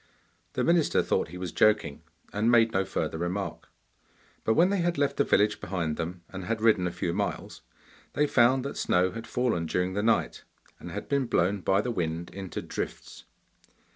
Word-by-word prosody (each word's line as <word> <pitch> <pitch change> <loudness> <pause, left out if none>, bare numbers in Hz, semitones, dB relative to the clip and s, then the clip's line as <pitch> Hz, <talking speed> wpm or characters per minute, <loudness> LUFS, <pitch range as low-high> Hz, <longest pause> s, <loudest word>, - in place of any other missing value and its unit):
The - - 0
minister 170 -2 +3
thought - - 0
he 90 +3 -9
was 90 -2 -5
joking, 105 -9 +2 0.3
and 105 +3 +1
made 115 -1 +5
no 95 -2 +1
further 80 - -3
remark. 90 +3 -4 0.7
But 110 - +2
when 180 +3 +4
they 200 - +1
had 175 -1 0
left 140 -1 0
the - - +4
village 105 +1 +2
behind 85 -4 -2
them, 85 +2 -5
and 95 -1 -7
had 115 +2 -1
ridden 110 -5 +3
a - - -3
few 85 0 -2
miles, 100 +2 -3 0.5
they 150 - +2
found 130 -1 +3
that 140 - -5
snow 90 +1 +2
had 115 0 -7
fallen 115 -10 0
during 90 +3 -1
the 100 - -1
night, 115 +2 +1 0.4
and - - -8
had - - -6
been 140 -3 0
blown 100 0 +1
by 95 +2 +2
the 125 - -2
wind 85 -4 -3
into 95 -3 -6
drifts. - - -6
100 Hz, 190 wpm, -28 LUFS, 90-120 Hz, 0.7 s, made